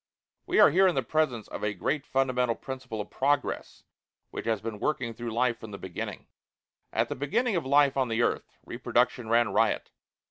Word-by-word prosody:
We - - +2
are - - +8
here 190 +2 +5
in 180 - +1
the 135 - +1
presence 125 -6 0
of - - -6
a 105 -1 -1
great 140 - -2
fundamental 125 -3 +1
principle 130 -5 -6
of 105 - -9
progress 140 +1 -1 0.5
which - - -6
has 110 -2 +1
been 110 -1 -6
working 125 -4 -1
through 120 +1 -5
life 120 +1 +1
from 110 - -9
the 100 - -7
beginning. 95 -3 -6 0.7
At - - +1
the - - -4
beginning 210 - 0
of 160 -6 -1
life 140 0 +4
on 130 -2 +1
the 115 0 +1
earth, - - -1 0.2
reproduction 120 -3 0
ran 115 -1 +4
riot. - - +1
125 Hz, 190 wpm, -28 LUFS, 115-140 Hz, 0.7 s, are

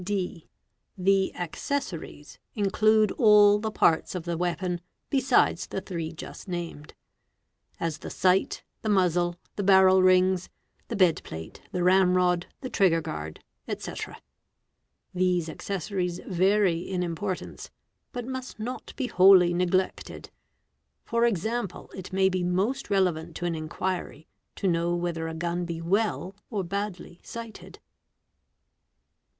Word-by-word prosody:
(d) 185 -4 -3 0.5
The 195 +1 +2
accessories 175 - -5 0.2
include 215 +1 +3
all 210 -2 +7
the 220 +1 -2
parts 170 -4 +2
of 180 - -3
the 170 0 -2
weapon 175 +1 -2 0.3
besides 265 -2 +2
the - - -3
_ - - -24
three 165 -4 -4
just 165 - -9
named; 170 -4 -6 0.8
as 165 -2 -2
the - - -7
sight, 185 +1 +1 0.2
the 220 - -2
muzzle, 175 -3 +2 0.2
the 205 - -1
barrel 190 -1 +6
rings, 185 0 +3 0.4
the - - -4
bed 180 -4 +4
_ - - -10
plate, 80 0 -9
the 180 -1 -1
ram 185 0 +4
rod, 180 -1 +2
the 260 - -5
trigger 180 -4 +3
guard, 75 - -6 0.3
&c. - - -6 1.2
These 180 -2 +1
accessories 180 0 -3
vary 190 -1 +2
in 180 +1 -3
f - - 0
importance: 180 +3 -5 0.4
but 245 -1 -5
must 260 -2 -6
not 245 +4 -6
be 265 - -2
wholly 185 -5 +6
neglected. 180 +1 -1 0.7
For 235 0 +2
example, 220 -1 -2
it 190 -2 -8
may 190 0 +3
be 185 -1 0
most 195 +10 0
relevant 175 -5 0
to 175 - -4
an 175 - 0
inquiry 160 0 -4 0.3
to 195 - -1
know 170 0 +1
whether 170 -2 -2
a 160 - -5
gun 175 +2 -2
be 170 -1 -4
well 195 +2 0
or 205 -5 -2
badly 185 -1 -5
}; - - -39
sighted. 230 -1 -9
185 Hz, 140 wpm, -27 LUFS, 175-200 Hz, 1.2 s, all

